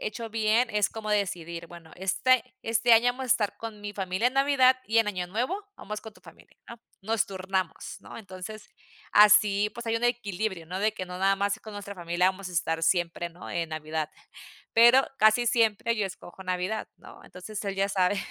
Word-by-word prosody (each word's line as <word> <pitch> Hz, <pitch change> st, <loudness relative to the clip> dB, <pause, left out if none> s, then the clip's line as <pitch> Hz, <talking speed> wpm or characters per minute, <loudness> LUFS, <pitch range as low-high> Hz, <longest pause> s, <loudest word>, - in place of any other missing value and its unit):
hecho 225 Hz, +2 st, -5 dB
bien 225 Hz, +2 st, +2 dB
es 210 Hz, -1 st, +2 dB
como 215 Hz, -1 st, -6 dB
decidir, 170 Hz, -5 st, -2 dB
bueno 170 Hz, -2 st, -13 dB
este 255 Hz, +7 st, +1 dB
este 230 Hz, +1 st, +2 dB
año 230 Hz, +2 st, +6 dB
vamos 265 Hz, +1 st, -7 dB
a -, -, -4 dB
estar 210 Hz, -4 st, +1 dB
con 220 Hz, -2 st, -8 dB
mi 205 Hz, 0 st, -6 dB
familia 190 Hz, +3 st, -1 dB
en 250 Hz, -, +1 dB
Navidad, 270 Hz, -2 st, +4 dB
y 225 Hz, +2 st, +2 dB
en 225 Hz, -, +3 dB
Año 185 Hz, -3 st, -3 dB
Nuevo 260 Hz, -, -2 dB
vamos 210 Hz, +1 st, -6 dB
con 220 Hz, -, -11 dB
tu -, -, -21 dB
familia, -, -, -18 dB
¿no? 235 Hz, -, -9 dB, 0.2 s
Nos 220 Hz, +1 st, 0 dB
turnamos, 190 Hz, -2 st, -3 dB
¿no? -, -, -10 dB
Entonces, 200 Hz, +1 st, -9 dB, 0.4 s
así 210 Hz, 0 st, +6 dB
pues, 235 Hz, -1 st, -8 dB
hay 225 Hz, 0 st, +1 dB
un 240 Hz, -, -2 dB
equilibrio, 205 Hz, -7 st, -2 dB
¿no? 185 Hz, +3 st, -5 dB
De 215 Hz, 0 st, +2 dB
que, 185 Hz, -4 st, -6 dB
no 180 Hz, 0 st, -7 dB
nada 195 Hz, +1 st, +3 dB
más 200 Hz, +1 st, 0 dB
con 215 Hz, -, -10 dB
nuestra 200 Hz, 0 st, -7 dB
familia 175 Hz, +1 st, +1 dB
vamos 190 Hz, 0 st, -8 dB
a -, -, -10 dB
estar 165 Hz, -1 st, -1 dB
siempre, 175 Hz, 0 st, +1 dB
¿no? 175 Hz, -, -11 dB
En 165 Hz, -1 st, -2 dB
Navidad. 155 Hz, 0 st, -4 dB, 0.6 s
Pero, 240 Hz, +4 st, +7 dB
casi 215 Hz, +3 st, +4 dB
siempre 230 Hz, 0 st, +2 dB
yo 210 Hz, -, 0 dB
escojo 190 Hz, 0 st, -11 dB
Navidad, 185 Hz, +4 st, -2 dB
¿no? -, -, -15 dB
Entonces, 200 Hz, +4 st, -8 dB
él 195 Hz, -1 st, -2 dB
ya 195 Hz, 0 st, +1 dB
sabe, 195 Hz, 0 st, +1 dB
205 Hz, 205 wpm, -27 LUFS, 185-225 Hz, 0.6 s, Pero